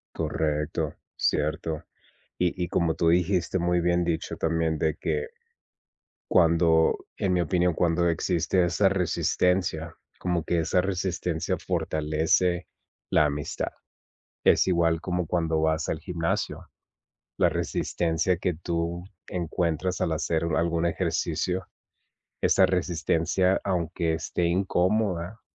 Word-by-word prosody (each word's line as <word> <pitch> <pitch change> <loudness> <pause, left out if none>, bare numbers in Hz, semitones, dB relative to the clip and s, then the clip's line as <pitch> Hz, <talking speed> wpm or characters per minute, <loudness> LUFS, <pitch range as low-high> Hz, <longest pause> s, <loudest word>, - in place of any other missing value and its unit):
Correcto, 75 0 -1 0.2
cierto. 75 +1 -1 0.5
Y 90 0 0
y - - -5
como 85 -2 +1
tú 85 - +1
dijiste, 90 +2 +2
muy 85 0 +1
bien 85 0 +2
dicho 85 -1 -2
también 80 -1 0
de 80 -1 +1
que 460 - -2 1.1
cuando, 80 -1 +4 0.2
en 95 -2 0
mi 90 - +2
opinión, 90 +1 +1
cuando 85 +1 +2
existe 85 +2 +1
esa 85 +4 +2
resistencia, 90 -2 0 0.2
como 90 -3 -1
que 85 - +1
esa 80 +3 +1
resistencia 90 -3 -1
fortalece 80 +3 0 0.4
la 75 - +4
amistad. 75 0 -2 0.8
Es - - +4
igual 85 -2 +2
como 90 0 -2
cuando 80 -1 0
vas 80 0 +1
al - - -3
gimnasio, 85 -2 -3 0.7
la - - +5
resistencia 85 +1 0
que 90 -1 -1
tú 85 +1 -3 0.2
encuentras 85 0 -1
al - - +1
hacer 80 +1 0
algún 85 0 +1
ejercicio, 90 +1 -1 0.8
esa 95 -1 +4
resistencia, 90 +1 +1
aunque 85 -3 -1
esté 85 +1 -2
incómoda, 95 +2 0
85 Hz, 115 wpm, -26 LUFS, 80-90 Hz, 1.1 s, la